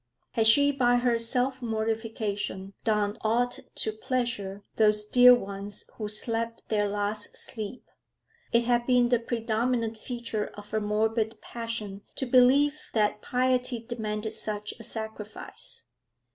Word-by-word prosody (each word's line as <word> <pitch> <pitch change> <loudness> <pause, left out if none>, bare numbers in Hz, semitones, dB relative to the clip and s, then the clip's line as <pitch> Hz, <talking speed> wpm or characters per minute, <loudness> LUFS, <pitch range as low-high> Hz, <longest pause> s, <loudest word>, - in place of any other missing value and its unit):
Had 225 -1 +2
she 285 +6 +6
by 245 -3 +3
her 240 -1 +2
self 255 +3 +1
mortification 220 -3 -3
done 210 -2 +1
aught 240 +3 +1 0.2
to 220 - -1
pleasure 215 -4 -3
those 210 -1 +4
dear 250 +3 +8
ones 200 -2 -5
who 215 - -5
slept 230 +2 -1
their 205 -2 +1
last 205 +1 -1
sleep? 220 +1 -3 0.7
It 235 0 +4
had 240 0 +1
been 250 -1 +4
the 245 -1 +3
predominant 230 0 -1
feature 235 -4 -4
of 205 0 -11
her 215 0 0
morbid 220 +1 0
passion 230 -4 -5
to 265 - -2
believe 265 +4 +4
that 210 -1 +1
piety 255 0 +1
demanded 220 -2 -4
such 210 -1 0
a - - -8
sacrifice. 220 -1 -5
225 Hz, 130 wpm, -28 LUFS, 210-245 Hz, 0.7 s, dear